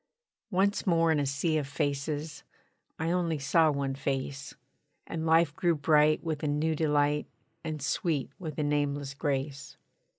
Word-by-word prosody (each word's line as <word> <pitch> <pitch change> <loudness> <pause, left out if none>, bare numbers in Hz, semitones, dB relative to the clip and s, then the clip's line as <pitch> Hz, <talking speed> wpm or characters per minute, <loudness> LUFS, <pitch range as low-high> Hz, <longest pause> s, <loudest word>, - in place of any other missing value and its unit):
Once 200 +1 +1
more 165 -2 +4
in 155 - +2
a 140 - 0
sea 155 +3 0
of 140 - -4
faces, 145 +1 -2 0.6
I 160 +2 -1
only 170 -3 0
saw 155 +3 +3
one 140 -2 -1
face; 135 +1 -3 0.5
And 160 0 -4
life 160 -2 +4
grew 170 0 +2
bright 150 +1 +3
with 160 -3 -3
a 155 - -1
new 150 +2 +1
delight, 150 -1 +1 0.4
And 155 -3 -4
sweet 150 -2 -1
with 155 -6 -6
a 150 - 0
nameless 145 -1 -1
grace. 140 -1 -3
150 Hz, 155 wpm, -29 LUFS, 140-160 Hz, 0.6 s, more